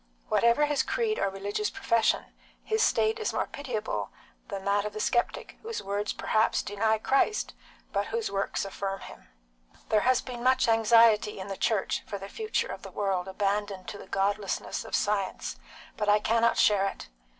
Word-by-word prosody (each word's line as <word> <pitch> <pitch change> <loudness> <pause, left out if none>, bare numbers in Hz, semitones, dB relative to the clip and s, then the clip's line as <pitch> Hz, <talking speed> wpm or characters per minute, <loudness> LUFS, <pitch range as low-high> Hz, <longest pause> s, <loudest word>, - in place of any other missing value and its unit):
Whatever 235 +6 +4
his 295 -1 +1
creed 450 -3 -1
or - - +2
his - - -11
religious 205 - -2
profession, 230 - +1 0.4
his 440 0 0
state 440 0 +2
is 440 - -1
more - - 0
pitiable 240 -7 -4 0.4
than 195 -3 -6
that 200 0 +2
of 210 0 -4
the 215 - -5
sceptic, 240 +2 -1
whose 455 0 -5
words 200 +1 -2
perhaps 220 +1 +1
deny 220 +2 +1
Christ, 275 - +1 0.4
but - - 0
whose 465 -1 -2
works 195 0 -1
affirm 195 0 -4
Him. - - -12 0.6
There 215 - +4
has 255 +2 +3
been 250 -2 -7
much 260 0 +4
anxiety 225 -1 +5
in 190 +1 -6
the 195 - -3
Church 210 0 0
for 200 - -4
the 195 0 -8
future 435 - -2
of - - -7
the - - -9
world 195 -3 -1
abandoned 200 0 -2
to 205 - -7
the - - -11
godlessness 195 +1 -1
of - - -3
science, 205 -2 -1 0.4
but 210 -1 0
I 205 - +6
cannot 230 +2 +2
share 195 -2 +4
it. 195 - -6
210 Hz, 180 wpm, -28 LUFS, 200-250 Hz, 0.6 s, I